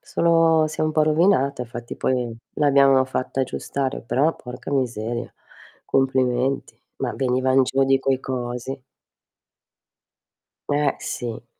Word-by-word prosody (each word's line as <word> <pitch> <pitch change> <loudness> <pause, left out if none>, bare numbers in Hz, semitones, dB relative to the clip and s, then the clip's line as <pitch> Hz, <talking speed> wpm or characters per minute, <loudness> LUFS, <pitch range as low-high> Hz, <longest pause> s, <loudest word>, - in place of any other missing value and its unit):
solo 165 -2 +3
si 155 - -9
è - - +3
un 155 - 0
po' 155 - +3
rovinata, 155 -4 +2
infatti 120 0 -8
poi 125 -3 -1 0.2
l'abbiamo 140 -2 +4
fatta 130 0 -3
aggiustare 135 +1 -3
però 145 +7 +1
porca 125 +2 -9
miseria, 120 -3 -2 0.5
complimenti. 130 0 0 0.2
Ma - - -2
venivan 130 0 +2
giù 135 +2 +1
di 135 0 +3
quei 135 -1 0
cosi. 125 +1 -4 1.9
Eh, 145 0 +1
sì. 120 -1 -5
135 Hz, 120 wpm, -23 LUFS, 125-140 Hz, 1.9 s, l'abbiamo